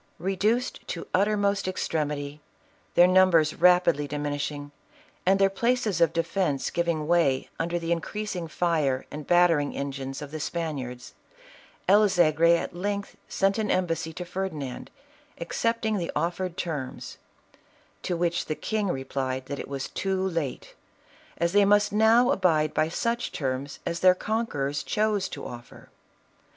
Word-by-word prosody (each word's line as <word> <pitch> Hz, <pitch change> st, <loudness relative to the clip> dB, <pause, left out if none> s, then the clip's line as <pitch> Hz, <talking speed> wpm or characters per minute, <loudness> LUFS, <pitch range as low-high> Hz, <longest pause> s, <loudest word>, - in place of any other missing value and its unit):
Eeduced 210 Hz, +6 st, 0 dB
to 170 Hz, -, -4 dB
the -, -, -11 dB
uttermost 200 Hz, 0 st, +1 dB
extremity, 150 Hz, -5 st, -2 dB, 0.5 s
their 175 Hz, -, +8 dB
numbers 180 Hz, -4 st, +4 dB
rapidly 175 Hz, -4 st, +4 dB
dimin 145 Hz, 0 st, -3 dB
ishing, 145 Hz, 0 st, -4 dB, 0.6 s
and 190 Hz, +1 st, +5 dB
their 195 Hz, 0 st, +5 dB
places 220 Hz, -1 st, 0 dB
of 165 Hz, -2 st, +5 dB
defence 165 Hz, -3 st, -1 dB
giving 170 Hz, -3 st, 0 dB
way 155 Hz, -6 st, +2 dB
under 170 Hz, +1 st, -1 dB
the 170 Hz, 0 st, -3 dB
increasing 180 Hz, +1 st, -3 dB
fire 155 Hz, -6 st, 0 dB
and 150 Hz, 0 st, -7 dB
battering 175 Hz, -5 st, +3 dB
engines 135 Hz, -1 st, -4 dB
of 145 Hz, -1 st, -8 dB
the 155 Hz, -, -5 dB
Span 160 Hz, 0 st, -3 dB
iards, 125 Hz, -1 st, -7 dB, 0.8 s
El 210 Hz, +2 st, +6 dB
Zegri 170 Hz, -1 st, +4 dB
at -, -, -5 dB
length 200 Hz, +2 st, -3 dB
sent 195 Hz, +2 st, +1 dB
an 215 Hz, -2 st, -1 dB
embassy 165 Hz, -3 st, 0 dB
to 180 Hz, +2 st, -7 dB
Ferdi 190 Hz, +1 st, -3 dB
nand, 135 Hz, -4 st, -6 dB, 0.5 s
accepting 220 Hz, +4 st, -1 dB
the 170 Hz, -, -3 dB
offered 180 Hz, +1 st, -2 dB
terms; 145 Hz, -7 st, -5 dB, 0.8 s
to 175 Hz, -, -2 dB
which 175 Hz, 0 st, 0 dB
the 155 Hz, -, -2 dB
king 215 Hz, +3 st, -2 dB
replied 130 Hz, -3 st, -3 dB
that 140 Hz, +1 st, -5 dB
it -, -, -6 dB
was 140 Hz, -1 st, -4 dB
too 190 Hz, -1 st, -1 dB
late, 165 Hz, -7 st, -4 dB, 0.6 s
as 170 Hz, +1 st, 0 dB
they 205 Hz, 0 st, +6 dB
must 205 Hz, +1 st, +3 dB
now 225 Hz, +4 st, +5 dB
abide 155 Hz, -, +2 dB
by 155 Hz, -, +1 dB
such 235 Hz, +7 st, -1 dB
terms 135 Hz, 0 st, -3 dB
as 170 Hz, -, -2 dB
their 185 Hz, 0 st, +6 dB
conquerors 145 Hz, -11 st, -2 dB
chose 215 Hz, -2 st, 0 dB
to -, -, -7 dB
offer. 120 Hz, -1 st, -11 dB
170 Hz, 150 wpm, -26 LUFS, 145-195 Hz, 0.8 s, their